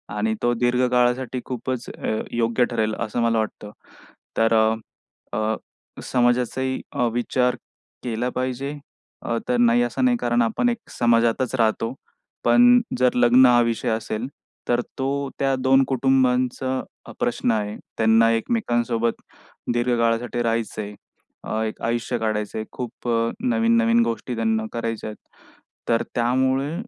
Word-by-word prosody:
आणि 110 +1 0
तो 120 0 +3
दीर्घ 120 +1 +1
काळासाठी 125 0 +1
खूपच 125 0 -4
अ, 110 - -3
योग्य 120 +1 +1
ठरेल 110 -2 0
असं 120 +1 -2
मला 115 -1 +2
वाटतं. 105 -1 -4 0.7
तर 115 0 +3 0.8
अ, 110 0 0 0.5
समाजाचाही 125 +1 0
अ, 120 - +1
विचार 125 +1 +1 0.5
केला 120 +1 -2
पाहिजे 130 +3 -2 0.5
अ, 115 - -2
तर 125 - +1
नाही 120 0 +4
असं 120 - 0
नाही, 245 -1 +3
कारण 120 - +1
आपण 115 - +1
एक 235 - -1 0.2
समाजातच 120 +2 +2
राहतो. 115 0 +1 0.5
पण 245 0 +6 0.2
जर 125 -1 +3
लग्न 125 +1 +6
हा 120 -1 +6
विषय 115 -1 -1
असेल, 110 +2 -2 0.4
तर 120 0 +2 0.2
तो 140 +1 -1
त्या 135 -1 +2
दोन 135 +1 +4
कुटुंबांचा 130 -1 0
प्रश्न 120 0 0
आहे. 105 -1 -1 0.2
त्यांना 115 +1 +4
एकमेकांसोबत 120 - 0 0.5
दीर्घकाळासाठी 120 0 0
राहायचं 115 -1 -1
आहे. 105 0 -7 0.5
अ, 110 - -2
एक 110 - -5
आयुष्य 120 +1 -1
काढायचं 110 -1 -2
आहे. 110 - -4
खूप 125 0 -7
अ, 115 0 +1
नवीन-नवीन 230 -1 +3
गोष्टी 120 +1 -3
त्यांना 110 -1 0
करायच्या 115 -2 -3
आहेत. 105 - -9 0.7
तर 115 -1 +2
त्यामुळे 130 +4 +1
120 Hz, 135 wpm, -23 LUFS, 115-130 Hz, 0.8 s, पण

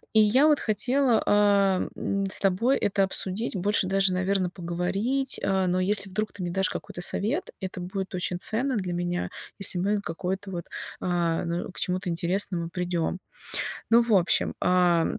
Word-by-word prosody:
И 220 - +8
я 245 +8 +5
вот 300 -2 +4
хотела, 245 +2 +2
эм, 200 -1 +2
с - - 0
тобой 205 +8 +2
это 195 0 +1
обсудить, 190 +4 0
больше 200 +1 +1
даже, 190 0 +2
наверно, 185 0 0
поговорить. 195 +10 0
Э, 190 -1 +1
но 180 +1 +1
если 195 +1 0
вдруг 215 +3 -3
ты 195 - -8
мне 175 - -2
дашь 190 +1 +1
какой-то - - -6
совет, 240 - -1
это 185 -1 -5
будет 190 +2 -5
очень 180 -1 -1
ценно 250 +7 -1
для 185 -4 -2
меня, 175 0 -2 0.3
если 195 -2 0
мы 200 +3 +1
какое-то 190 +1 -4
вот, 175 -3 -5 0.4
а, 170 -2 0
ну, 170 0 -3
к - - -10
чему-то 185 0 -1
интересному 170 0 -1
придём. 175 -1 -2 0.7
Ну, 235 +1 +7
в 230 -2 +2
общем, 185 -3 +3 0.5
ам - - -1
190 Hz, 165 wpm, -26 LUFS, 180-210 Hz, 0.7 s, И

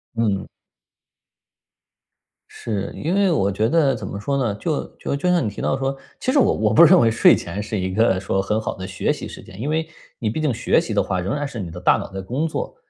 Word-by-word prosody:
嗯。 105 -4 0 2.0
是， 100 -4 -4
因 165 +4 -2
为 195 -2 +3
我 100 -10 +1
觉 110 +3 0
得 145 -3 +3
怎 100 - -6
么 100 - -6
说 140 +7 -2
呢， 120 -7 0
就 155 +6 -2
就 - - -3
就 160 +6 0
像 175 -7 +2
你 - - 0
提 100 - -8
到 135 - 0
说 135 0 -2 0.2
其 255 - 0
实 285 - +3
我 - - +4
我 110 0 +1
不 120 - +8
认 175 +2 +7
为 115 - +4
睡 115 - +6
前 90 +4 -5
是 105 0 -3
一 95 0 -2
个 105 -3 +3
说 95 0 -1
很 105 +3 -1
好 110 - -4
的 95 0 -7
学 95 - -1
习 - - -7
时 - - -10
间。 95 - -13
因 140 - -2
为 160 +1 0 0.3
你 110 -2 -2
毕 155 - -3
竟 150 -3 +1
学 120 0 +2
习 - - -6
的 - - +2
话 95 -1 -2
仍 95 +7 -2
然 145 -1 -2
是 130 -4 -7
你 90 -4 -5
的 85 +2 -8
大 90 - +4
脑 - - -7
在 95 - -5
工 130 +11 -2
作， 160 - -4
115 Hz, 270 characters per minute, -21 LUFS, 100-145 Hz, 2.0 s, 不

